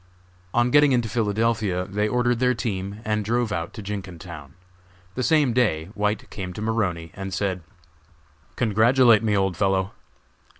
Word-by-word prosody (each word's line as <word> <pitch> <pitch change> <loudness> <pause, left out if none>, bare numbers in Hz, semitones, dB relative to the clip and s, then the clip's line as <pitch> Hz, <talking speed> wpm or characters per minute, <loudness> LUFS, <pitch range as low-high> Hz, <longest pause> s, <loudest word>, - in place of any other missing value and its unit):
On 120 +3 +2
getting 145 -1 +5
into 120 -2 +1
Philadelphia 105 -3 0
they 105 +2 -1
ordered 120 +1 +1
their 125 0 +2
team 100 -2 -4
and 105 -1 0
drove 115 +1 0
out 85 -4 -3
to 110 - -8
Jenkintown. 90 -7 -7 0.6
The 130 - -3
same 150 -3 +3
day 95 -10 +1
White 105 0 -1
came 90 -2 -6
to 105 - -7
Maroney 90 -7 -1
and 95 0 -6
said: 95 -1 -2 0.9
"Congratulate 115 +1 +4
me, 105 -2 +1
old 95 -2 +1
fellow. 95 +1 +1
105 Hz, 145 wpm, -24 LUFS, 95-115 Hz, 0.9 s, getting